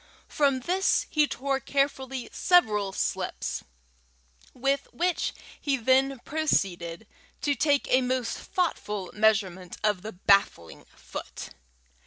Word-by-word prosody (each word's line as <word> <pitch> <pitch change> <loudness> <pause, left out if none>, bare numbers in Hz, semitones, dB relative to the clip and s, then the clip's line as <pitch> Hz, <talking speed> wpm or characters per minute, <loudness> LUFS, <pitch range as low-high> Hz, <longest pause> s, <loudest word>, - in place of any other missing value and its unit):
From 275 -3 +2
this 370 +7 +1
he 300 -1 +3
tore 270 0 -1
carefully 270 -3 -1
several 210 - +3
slips, - - -2 0.9
with 275 +2 -1
which 355 0 0 0.3
he 280 -2 +1
then 265 +3 +3
proceeded 195 - -1 0.4
to 290 - +2
take 285 +1 +2
a 255 - +5
most 250 -1 -1
thoughtful 210 - -2
measurement 195 -4 +1
of 210 -3 +1
the 220 +3 -7
baffling 185 - +2
foot. - - -8
260 Hz, 110 wpm, -27 LUFS, 210-285 Hz, 0.9 s, a